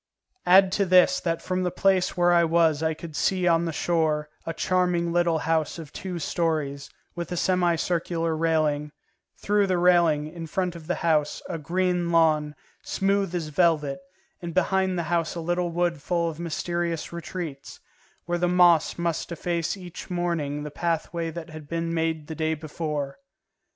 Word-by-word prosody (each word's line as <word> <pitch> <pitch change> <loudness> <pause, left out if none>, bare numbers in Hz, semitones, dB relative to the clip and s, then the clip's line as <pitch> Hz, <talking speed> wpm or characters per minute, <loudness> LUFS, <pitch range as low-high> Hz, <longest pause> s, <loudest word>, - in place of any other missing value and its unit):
Add 190 +1 +7
to 200 +1 +1
this 180 0 +5
that 165 -1 -2
from 185 0 -1
the 180 - 0
place 185 +1 +1
where 175 0 +4
I 170 0 +5
was 165 -2 +3
I 160 0 0
could 160 -1 -9
see 185 +5 +1
on 170 0 +3
the 165 - -2
shore 155 -2 0 0.2
a - - 0
charming 175 -1 0
little 175 -1 +2
house 160 0 0
of 160 -3 -10
two 185 -2 -5
stories, 155 -4 -2 0.2
with 170 -1 -6
a 175 - -2
semicircular 170 -2 0
railing; 155 -2 0 0.4
through 205 -1 +1
the 185 -1 +1
railing, 170 -4 +4
in 165 +1 -7
front 180 +2 -2
of 160 -2 -10
the 180 - 0
house, 150 -3 +1
a 165 - -4
green 180 +2 0
lawn, 155 -3 +3 0.3
smooth 195 -2 0
as 165 -3 -3
velvet, 150 -3 +1 0.4
and 170 -2 -6
behind 190 0 +1
the 170 - -1
house 165 0 -1
a - - -4
little 175 +1 -1
wood 170 -2 -1
full 170 +2 0
of 155 - -12
mysterious 170 0 -3
retreats, 170 -4 -6 0.5
where 175 0 -1
the 175 - +2
moss 175 -2 +4
must 170 -1 -2
efface 170 +1 -2
each 180 -1 -9
morning 170 -5 -2
the 150 - -6
pathway 165 +1 -2
that 165 0 -8
had 155 -2 -10
been 165 0 -2
made 160 -2 -1
the 160 - -6
day 160 0 -1
before. 150 -2 -4
170 Hz, 170 wpm, -25 LUFS, 160-175 Hz, 0.5 s, Add